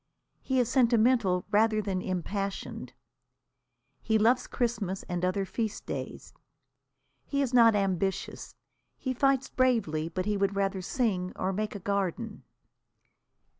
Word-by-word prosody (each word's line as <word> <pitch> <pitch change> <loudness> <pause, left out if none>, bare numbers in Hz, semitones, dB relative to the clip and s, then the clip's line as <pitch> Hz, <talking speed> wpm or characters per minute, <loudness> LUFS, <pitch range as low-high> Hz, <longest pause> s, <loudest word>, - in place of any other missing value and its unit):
He 260 -1 0
is 245 - +2
sentimental 235 -6 +3
rather 215 +1 +3
than 195 -3 -2
impassioned. 195 +2 -4 1.1
He 220 -1 +2
loves 235 +4 +3
Christmas 220 -6 -2
and 175 -1 -4
other 185 +2 +1
feast 220 +2 -3
days. - - -6 0.9
He 280 -1 0
is 260 -2 -3
not 230 -3 +6
ambitious. 195 -1 -2 0.4
He 260 - -2
fights 270 +1 +2
bravely, 205 -12 +1
but 185 +2 -3
he 210 -1 0
would 200 0 0
rather 195 -1 0
sing 185 -4 -1
or 190 +1 -1
make 215 +2 -3
a - - -4
garden. 195 -2 -2
205 Hz, 130 wpm, -29 LUFS, 190-240 Hz, 1.1 s, not